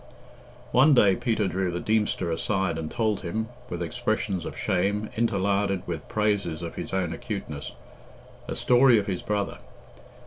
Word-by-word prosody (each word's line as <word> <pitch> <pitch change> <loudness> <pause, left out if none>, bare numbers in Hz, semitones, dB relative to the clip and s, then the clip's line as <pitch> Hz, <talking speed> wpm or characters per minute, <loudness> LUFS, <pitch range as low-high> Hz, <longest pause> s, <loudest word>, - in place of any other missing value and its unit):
One 135 +3 +6
day 100 -5 +6
Peter 110 -3 0
drew 95 +1 -1
the 85 0 -3
Deemster 105 -4 0
aside 95 0 0
and 80 -1 -4
told 110 -3 0
him 110 +5 -3 0.2
(with 85 0 -3
expressions 105 -2 -1
of - - -6
shame, 100 +4 0
interlarded 100 -3 +1
with 85 -2 -5
praises 100 -6 0
of 85 - -5
his - - -6
own 90 -3 -1
acuteness) 80 -6 -5 0.7
a - - -3
story 125 -1 +5
of 105 - 0
his 95 -4 -2
brother. 105 -1 -2
100 Hz, 150 wpm, -26 LUFS, 90-110 Hz, 0.7 s, One